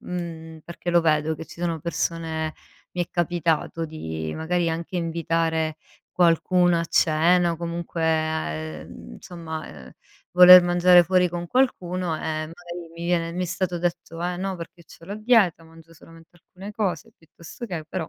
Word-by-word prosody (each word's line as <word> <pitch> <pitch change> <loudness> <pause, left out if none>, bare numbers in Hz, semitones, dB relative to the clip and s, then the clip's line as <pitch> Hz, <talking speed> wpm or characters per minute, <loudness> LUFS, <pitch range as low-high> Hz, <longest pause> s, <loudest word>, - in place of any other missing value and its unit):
mh-mh, 165 -2 -7
perché 170 +1 -5
lo 175 - +4
vedo 155 -1 +1
che 160 - -8
ci 170 - -13
sono 170 -2 -2
persone 160 -1 -3 0.4
mi 180 - -1
è - - -28
capitato 165 -1 -1
di 80 - -5
magari 170 +2 -1
anche 170 +2 -4
invitare 165 -1 -1 0.3
qualcuno 175 0 +3
a 170 - -1
cena 170 +3 +3
o 165 - -5
comunque 170 0 -4
a 160 - 0
ehm, 80 -6 -8
somma, 165 -3 -7
ehm, 65 -4 -12 0.4
voler 180 0 +10
mangiare 175 0 +5
fuori 180 0 +3
con 175 0 -5
qualcuno, 185 -8 0
e - - -8
magari 165 +2 -6
mi 170 - -6
viene 170 -1 0
mi 180 +1 -2
stato 180 0 -2
detto: 170 -1 -3
"Eh 180 0 -2
no, 190 +1 -3
perché 170 0 -11
c'ho 165 - -16
la 200 - -6
dieta, 215 -7 +3
mangio 165 0 -17
solamente 165 0 -17
alcune 190 +4 -11
cose 195 -8 -3
piuttosto 170 +7 -11
che" 170 -7 -5
però. 170 -2 -4
170 Hz, 165 wpm, -24 LUFS, 160-175 Hz, 0.4 s, voler